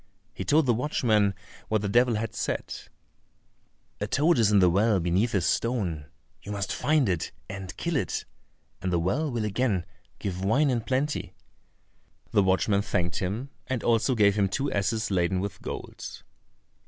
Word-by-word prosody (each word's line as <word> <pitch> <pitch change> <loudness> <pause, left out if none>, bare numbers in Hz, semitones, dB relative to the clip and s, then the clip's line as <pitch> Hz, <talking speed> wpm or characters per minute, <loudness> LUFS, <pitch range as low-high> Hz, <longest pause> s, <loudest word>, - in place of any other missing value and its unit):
He - - -5
told 155 +1 +3
the 120 - +3
watchman 110 -6 +1 0.3
what 110 -1 0
the - - 0
devil 120 +3 +3
had 110 +1 -3
said: - - -3 1.3
"A - - -2
toad 155 +1 +3
is 110 -2 +4
in 105 - +5
the 95 -2 +6
well 100 +3 +3
beneath 90 +7 +1
a 95 - +3
stone; 90 - -1 0.3
you 105 - -8
must 100 -1 -2
find 150 -4 +2
it 90 -4 -1 0.2
and 95 0 -7
kill 170 -1 -2
it, 135 - -1 0.6
and 90 - -1
the 85 - +2
well 125 - 0
will 115 -4 -2
again 105 -3 0 0.3
give 95 -1 -4
wine 135 +8 +3
in 120 -2 0
plenty." 130 -6 -2 1.0
The 105 - +4
watchman 95 +1 +2
thanked 85 -3 -1
him, 110 +9 -3 0.2
and 130 -3 -2
also 120 +2 +2
gave 100 -3 +5
him 100 -1 +1
two 140 +8 -1
asses 110 +2 0
laden 90 0 +1
with 100 0 -4
gold. - - -7
105 Hz, 165 wpm, -27 LUFS, 95-125 Hz, 1.3 s, the